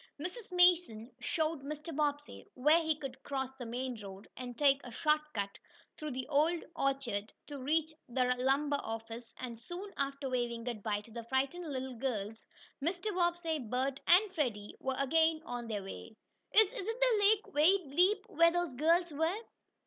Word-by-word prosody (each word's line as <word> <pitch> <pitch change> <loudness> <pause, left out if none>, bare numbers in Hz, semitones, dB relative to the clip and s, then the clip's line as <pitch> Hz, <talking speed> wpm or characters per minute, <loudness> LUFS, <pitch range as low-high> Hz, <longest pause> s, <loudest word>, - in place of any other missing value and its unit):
Mrs. 370 +7 -6
Mason 350 -11 +4
showed 315 -3 -1
Mr. 300 +3 -6
Bobbsey 290 -1 -2
where 300 +6 +5
he 320 -1 +1
could 275 -4 -7
cross 265 -2 -3
the 245 - -5
main 245 -1 -4
road, 195 0 -9
and 245 -2 -7
take 280 -1 +4
a 245 - -8
short 300 +5 +2
cut 200 -2 -3 0.4
through 305 - -6
an 260 -3 -3
old 315 +3 +2
orchard, 245 -7 -1
to 285 -2 -7
reach 315 +4 +1 0.2
the 250 0 +2
lumber 280 +3 +2
office, 225 +1 -6
and 235 -3 -6
soon, 360 - -7
after 275 0 -2
waving 240 -2 -1
good 235 -3 -4
bye 205 0 -1
to 225 - -17
the 230 +1 -6
frightened 275 +7 -1
little 260 -1 -3
girls, 220 -4 -3 0.4
Mr. 360 +6 -1
Bobbsey, 345 -3 0
Bert 260 +3 -1
and 375 +3 +6
Freddie 230 - -2
were 265 0 -2
again 320 +3 +3
on 245 -1 -5
their 210 -3 -3
way. 205 +3 -9 0.4
"Is 435 -3 +5
is 390 - -5
the 470 -1 +2
lake 410 +1 +3
very 315 0 +3
deep 390 +4 +4
where 335 -5 +5
those 350 -1 -1
girls 330 +6 +2
were?" 320 +6 0
280 Hz, 170 wpm, -33 LUFS, 245-335 Hz, 0.4 s, and